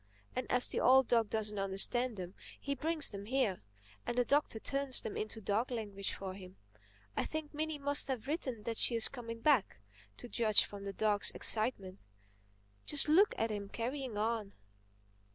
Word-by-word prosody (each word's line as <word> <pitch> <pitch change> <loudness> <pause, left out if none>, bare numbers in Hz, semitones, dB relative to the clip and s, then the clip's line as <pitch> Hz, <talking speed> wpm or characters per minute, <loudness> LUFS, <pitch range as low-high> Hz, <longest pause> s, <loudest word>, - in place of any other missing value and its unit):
And 255 - -3
as 250 0 +7
the - - -2
old 265 -1 +5
dog 230 -3 +2
doesn't 210 -2 -2
understand 205 +5 0
them, 180 0 -7 0.3
he 280 - -3
brings 315 +2 0
them 200 -1 -7
here, 240 - 0 0.4
and 240 - -4
the 245 - +3
Doctor 285 -4 +1
turns 275 +1 -1
them 215 - -6
into 215 +1 -4
dog 220 +4 -1
language 205 -5 -3
for 190 -1 -6
him. 185 -1 -12 0.6
I - - 0
think 315 -1 -5
Minnie 310 0 -3
must 285 0 +3
have 260 -4 -3
written 265 -7 -3
that 230 -1 -4
she 240 - +4
is 230 - +4
coming 230 -3 -8
back—to 105 - -1
judge 220 -3 +4
from 200 -1 -9
the 200 - -5
dog's 210 -1 +1
excitement. 205 -4 +2 0.9
Just 295 0 +2
look 385 +7 +5
at 225 0 -1
him 200 -1 -5
carrying 250 0 -4
on!" 215 -1 -2
230 Hz, 170 wpm, -34 LUFS, 205-265 Hz, 0.9 s, as